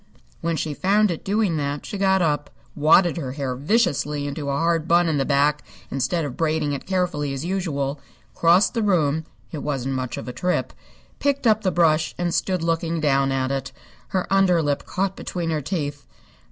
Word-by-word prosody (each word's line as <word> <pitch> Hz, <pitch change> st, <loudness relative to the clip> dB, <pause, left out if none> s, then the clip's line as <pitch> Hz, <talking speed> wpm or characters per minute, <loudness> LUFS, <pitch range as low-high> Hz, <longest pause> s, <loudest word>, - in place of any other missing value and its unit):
When 165 Hz, 0 st, -1 dB
she 155 Hz, -1 st, -2 dB
found 200 Hz, +5 st, +2 dB
it 165 Hz, -, -5 dB
doing 200 Hz, -4 st, +1 dB
that 145 Hz, 0 st, -3 dB
she -, -, -6 dB
got 190 Hz, -1 st, +3 dB
up, 145 Hz, -2 st, 0 dB, 0.3 s
wadded 165 Hz, +4 st, +4 dB
her 130 Hz, -6 st, -4 dB
hair 135 Hz, -3 st, -3 dB
viciously 145 Hz, -, 0 dB
into 145 Hz, 0 st, -4 dB
a 140 Hz, -, 0 dB
hard 165 Hz, 0 st, +1 dB
bun 175 Hz, +1 st, +4 dB
in 155 Hz, -3 st, +1 dB
the 135 Hz, -, +1 dB
back 145 Hz, +1 st, +2 dB, 0.3 s
instead 155 Hz, +5 st, 0 dB
of 130 Hz, -3 st, -5 dB
braiding 155 Hz, -2 st, 0 dB
it 140 Hz, -, -6 dB
carefully 180 Hz, -7 st, -1 dB
as 135 Hz, +4 st, -5 dB
usual, 150 Hz, -7 st, -2 dB, 0.3 s
crossed 170 Hz, +4 st, +4 dB
the 230 Hz, -, 0 dB
room 160 Hz, -6 st, +1 dB, 0.3 s
(it 155 Hz, -, -5 dB
wasn't 135 Hz, -2 st, -2 dB
much 130 Hz, -1 st, -3 dB
of -, -, -7 dB
a 125 Hz, -, -5 dB
trip), 180 Hz, +6 st, -1 dB, 0.5 s
picked 280 Hz, -2 st, 0 dB
up 220 Hz, -1 st, +4 dB
the 190 Hz, -, +1 dB
brush, 165 Hz, -3 st, +2 dB
and 175 Hz, -1 st, -1 dB
stood 185 Hz, -3 st, 0 dB
looking 165 Hz, 0 st, 0 dB
down 135 Hz, -2 st, +2 dB
at 130 Hz, 0 st, 0 dB
it, 135 Hz, -1 st, -3 dB, 0.4 s
her 185 Hz, -1 st, -1 dB
under 190 Hz, -3 st, +4 dB
lip 145 Hz, -3 st, -1 dB
caught 195 Hz, 0 st, -1 dB
between 170 Hz, -2 st, -3 dB
her 155 Hz, -1 st, -1 dB
teeth. 145 Hz, -3 st, -4 dB
160 Hz, 195 wpm, -23 LUFS, 145-180 Hz, 0.5 s, wadded